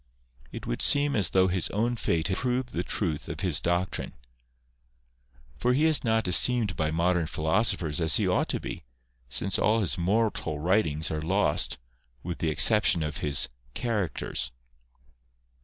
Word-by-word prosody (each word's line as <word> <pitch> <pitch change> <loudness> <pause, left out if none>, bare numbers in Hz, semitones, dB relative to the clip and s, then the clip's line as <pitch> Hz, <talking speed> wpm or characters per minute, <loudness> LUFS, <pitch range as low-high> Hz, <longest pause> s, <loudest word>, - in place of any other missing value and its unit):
It - - -8
would - - -3
seem 145 0 +3
as 105 -5 +1
though 95 0 +3
his 90 -1 0
own 115 +4 -1
fate 85 -6 -1
has 95 - -1
proved 125 0 -2
the 85 - -1
truth 85 -5 -2
of - - -6
his - - 0
doctrine. 85 +2 -2 1.4
For 125 +1 +1
he 150 +4 +2
is 160 -2 +3
not 110 -3 0
esteemed 110 +2 +4
by 80 -1 -1
modern 85 +1 0
philoso 95 +10 +1
phers 80 -3 -3
as 80 - +3
he - - +1
ought - - 0
to - - -1
be, - - -7 0.5
since 95 +9 -2
all 110 +1 +2
his 90 -3 -2
moral 95 -4 0
writings 80 -2 +1
are 80 -1 -3
lost, 85 -1 +1 0.5
with 85 0 -5
the 80 - 0
exception 90 0 +4
of 75 -1 -4
his 70 -1 +1 0.2
" - - -33
Characters." 100 - -1
90 Hz, 165 wpm, -27 LUFS, 80-110 Hz, 1.4 s, esteemed